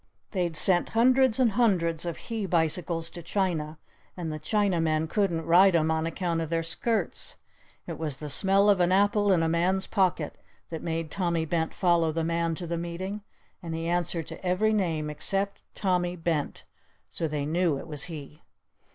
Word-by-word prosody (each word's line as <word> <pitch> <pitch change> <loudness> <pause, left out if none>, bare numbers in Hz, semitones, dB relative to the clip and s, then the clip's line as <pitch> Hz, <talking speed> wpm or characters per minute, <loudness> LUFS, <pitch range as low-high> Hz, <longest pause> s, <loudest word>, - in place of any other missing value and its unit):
They'd 175 -5 -1
sent 175 +2 +5
hundreds 255 0 +4
and 245 -4 +4
hundreds 180 -8 +1
of 170 - -4
he 225 -4 -4
bicycles 165 0 0
to 175 - -9
China 165 -3 -2 0.4
and 165 -3 -4
the 155 - -5
Chinamen 165 -4 +1
couldn't 170 -4 0
ride 180 +2 +5
'em 160 -1 +2
on 160 0 0
account 165 0 -2
of 160 - -4
their 165 0 0
skirts! 210 +3 -1 0.5
It - - -7
was 150 -4 -3
the 150 - -7
smell 195 +7 +3
of 200 -2 +4
an 175 0 +3
apple 205 +1 +3
in 170 -3 +3
a - - +1
man's 180 +4 +1
pocket 185 -7 0 0.3
that 160 - -5
made 165 -2 -3
Tommy 170 -3 -1
Bent 160 0 -1
follow 170 -3 +2
the 165 +1 -2
man 165 0 0
to 175 - -6
the 170 0 -3
meeting. 185 +5 -5 0.4
And 165 -3 -5
he 165 0 -3
answered 170 -1 -1
to - - -9
every 190 +4 +1
name 165 -7 0
except 195 +6 0
'Tommy 180 -3 0
Bent' 165 -4 -2 0.4
so 165 - -3
they 150 -2 -3
knew 165 -1 +1
it - - -8
was 150 -3 -1
he! 150 -3 -9
170 Hz, 180 wpm, -27 LUFS, 160-190 Hz, 0.5 s, sent